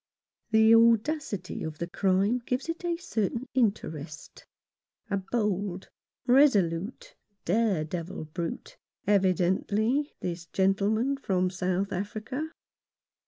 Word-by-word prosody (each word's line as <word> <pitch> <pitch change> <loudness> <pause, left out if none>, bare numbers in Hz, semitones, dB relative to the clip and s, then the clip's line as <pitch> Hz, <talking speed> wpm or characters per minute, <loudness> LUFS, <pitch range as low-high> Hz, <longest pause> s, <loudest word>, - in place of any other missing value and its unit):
The 220 0 +6
audacity 230 - +2
of 155 -1 -5
the 170 - -2
crime 195 +6 +1
gives 250 +4 -3
it 330 +2 -4
a 345 -1 -1
certain 240 - -2
interest. 160 - -2 0.6
A 200 - +2
bold, 195 -2 -2 0.4
resolute, 245 - +3 0.3
dare 195 -3 +2
devil 165 +1 -5
brute, 165 +2 -6 0.3
evidently, 200 - +1
this 170 -1 -5
gentleman 205 +9 +1
from 185 -8 0
South 185 +1 -1
Africa. 220 - -4
200 Hz, 100 wpm, -28 LUFS, 180-240 Hz, 0.6 s, The